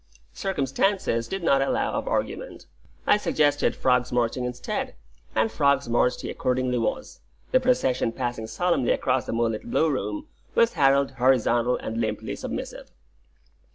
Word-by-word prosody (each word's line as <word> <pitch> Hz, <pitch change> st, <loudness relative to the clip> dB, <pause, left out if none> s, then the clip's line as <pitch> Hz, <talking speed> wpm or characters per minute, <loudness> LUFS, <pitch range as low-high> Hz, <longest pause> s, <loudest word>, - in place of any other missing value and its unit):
Circumstances 140 Hz, -, 0 dB
did 195 Hz, -2 st, -4 dB
not 135 Hz, -4 st, +3 dB
allow 270 Hz, -, 0 dB
of -, -, -3 dB
argument; -, -, -3 dB, 0.4 s
I 205 Hz, -, +5 dB
suggested 145 Hz, -7 st, +1 dB
frog's 125 Hz, -1 st, +1 dB
marching 120 Hz, +1 st, 0 dB
instead, 125 Hz, 0 st, -4 dB, 0.4 s
and 110 Hz, 0 st, +2 dB
frog's 140 Hz, +3 st, +2 dB
marched 120 Hz, +1 st, +1 dB
he -, -, -4 dB
accordingly 125 Hz, -1 st, 0 dB
was, 115 Hz, -, -3 dB, 0.3 s
the 260 Hz, -, +5 dB
procession 185 Hz, -, +1 dB
passing 120 Hz, -2 st, -4 dB
solemnly 135 Hz, +2 st, +1 dB
across 130 Hz, 0 st, 0 dB
the -, -, -2 dB
moonlit 115 Hz, 0 st, -1 dB
Blue 160 Hz, +6 st, +2 dB
Room, 300 Hz, -, -3 dB, 0.3 s
with 230 Hz, 0 st, +4 dB
Harold 140 Hz, 0 st, +3 dB
horizontal 125 Hz, -2 st, +2 dB
and 115 Hz, +1 st, -4 dB
limply 110 Hz, -2 st, -3 dB
submissive. -, -, -6 dB
130 Hz, 140 wpm, -25 LUFS, 120-155 Hz, 0.4 s, I